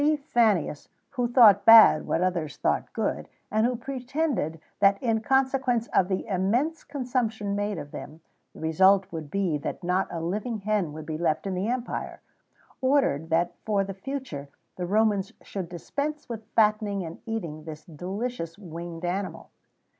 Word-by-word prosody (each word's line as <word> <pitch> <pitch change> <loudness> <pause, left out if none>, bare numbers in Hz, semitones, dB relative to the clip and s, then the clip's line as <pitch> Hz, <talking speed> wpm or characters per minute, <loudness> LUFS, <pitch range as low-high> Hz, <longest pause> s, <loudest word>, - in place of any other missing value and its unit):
Fannius, 205 -11 +1 0.2
who 245 -3 0
thought 230 -6 +7
bad 225 -8 +8
what 170 - +1
others 170 -6 -1
thought 75 - 0
good, - - -2 0.2
and 215 +2 +3
who 250 - -1
pretended 260 - -2 0.2
that 200 0 +5
in 225 -3 +1
consequence 265 -1 +1
of 185 - +4
the 190 -1 -2
immense 230 - 0
consumption 235 -7 -2
made 205 -1 -2
of 145 -2 -7
them, 155 +2 -9 0.3
the - - -11
result 190 +5 +4
would 160 -3 -6
be 180 -4 0
that 160 - -5
not 180 +2 +1
a 170 - -4
living 205 +8 -2
hen 200 -5 0
would 155 +1 -8
be 155 0 -4
left 160 0 0
in 195 - -2
the 185 +3 -1
empire, 245 0 -3 0.6
ordered 260 - +2
that 170 +2 +1
for 205 -2 +1
the 195 0 -5
future 195 - -6 0.3
the 180 -1 -4
Romans 205 -1 +1
should 185 -4 -5
dispense 285 - -4
with 225 -3 -7
fattening 210 -3 +2
and 165 0 -8
eating 170 -9 -4
this 155 -1 -8
delicious 180 +2 -5
winged 170 -2 -7
animal. 190 +2 -4
200 Hz, 160 wpm, -26 LUFS, 170-235 Hz, 0.6 s, bad